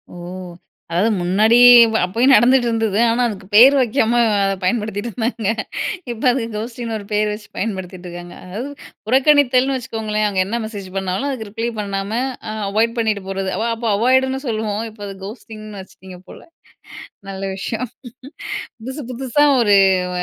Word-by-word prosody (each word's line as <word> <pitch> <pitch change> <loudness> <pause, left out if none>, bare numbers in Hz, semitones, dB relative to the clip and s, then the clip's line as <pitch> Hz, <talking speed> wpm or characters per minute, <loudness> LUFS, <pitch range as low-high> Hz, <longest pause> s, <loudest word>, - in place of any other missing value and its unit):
ஓ! - - -9 0.7
அதாவது 185 +7 +2
முன்னாடி 210 +6 +3 0.4
ப - - -1
அப்பயும் 240 +9 +3
நடந்துட்டு 245 +2 +5
இருந்தது. 225 -2 0
ஆனா, 245 +2 0
அதுக்கு 190 -3 -8
பேர் 260 +6 +9
வைக்காம, 235 -2 +1 0.3
அத 195 - +1
பயன்படுத்திட்டிருந்தாங்க. 220 +2 -2 0.6
இப்ப 230 - -8
அதுக்கு 230 -2 -3
கோஸ்டிங்ன்னு 230 0 -5
ஒரு 200 - -10
பேரு 210 0 +1
வச்சு 210 0 -8
பயன்படுத்திட்டிருக்காங்க. 180 -3 -6
அதாவது 220 +10 -6 0.4
புறக்கணித்தல்னு 265 0 +3
வச்சுக்கோங்களேன். 220 -3 -2
அங்க 195 -2 -2
என்ன 235 +4 -3
மெசேஜ் 205 -3 -7
பண்ணாலும், 190 +7 -2
அதுக்கு 230 -6 -5
ரிப்ளே 225 +2 -3
பண்ணாம, 200 0 -3 0.4
அ - - -4 0.2
அவாய்ட் 230 +3 +1
பண்ணிட்டு 215 -3 0
போறது. 195 0 -3
அவ 220 - -1
அப்ப 230 0 -4
அவாய்டுன்னு 260 +4 +2
சொல்லுவோம். 215 -1 -2
இப்ப 215 -1 -17
அது 195 - -8
கோஸ்ட்டிங்னு 215 -1 -10
வச்சுட்டீங்க 185 -1 -13
போல. - - -11 0.9
நல்ல 190 0 -7
விஷயம். 225 +5 -4 0.9
புதுசு 260 +6 -6
புதுசா 265 +3 +1 0.2
ஒரு 205 -3 +4 0.4
அ - - 0
220 Hz, 145 wpm, -19 LUFS, 200-240 Hz, 0.9 s, பேர்